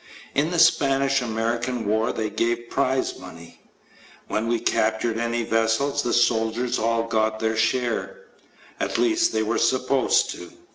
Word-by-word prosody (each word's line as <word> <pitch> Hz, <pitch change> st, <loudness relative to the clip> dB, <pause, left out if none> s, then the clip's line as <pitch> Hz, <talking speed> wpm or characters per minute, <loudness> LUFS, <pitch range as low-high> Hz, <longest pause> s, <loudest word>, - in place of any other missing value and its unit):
In 145 Hz, +3 st, +1 dB
the 175 Hz, -, -2 dB
Spanish 135 Hz, -4 st, +3 dB
American 115 Hz, +1 st, -2 dB
War 110 Hz, +3 st, +1 dB
they 110 Hz, -2 st, -3 dB
gave 120 Hz, +2 st, -2 dB
prize 130 Hz, -1 st, 0 dB
money. 85 Hz, -2 st, -13 dB, 0.7 s
When 110 Hz, +1 st, -2 dB
we 120 Hz, 0 st, 0 dB
captured 110 Hz, +1 st, 0 dB
any 115 Hz, 0 st, -1 dB
vessels, 115 Hz, +6 st, +1 dB
the 120 Hz, -, -2 dB
soldiers 120 Hz, 0 st, +1 dB
all 115 Hz, +1 st, +1 dB
got 110 Hz, -1 st, 0 dB
their 110 Hz, 0 st, 0 dB
share 125 Hz, -, -1 dB, 0.6 s
at -, -, -2 dB
least, 340 Hz, 0 st, +2 dB
they -, -, 0 dB
were -, -, -1 dB
supposed -, -, +2 dB
to. -, -, -10 dB
115 Hz, 145 wpm, -23 LUFS, 110-130 Hz, 0.7 s, Spanish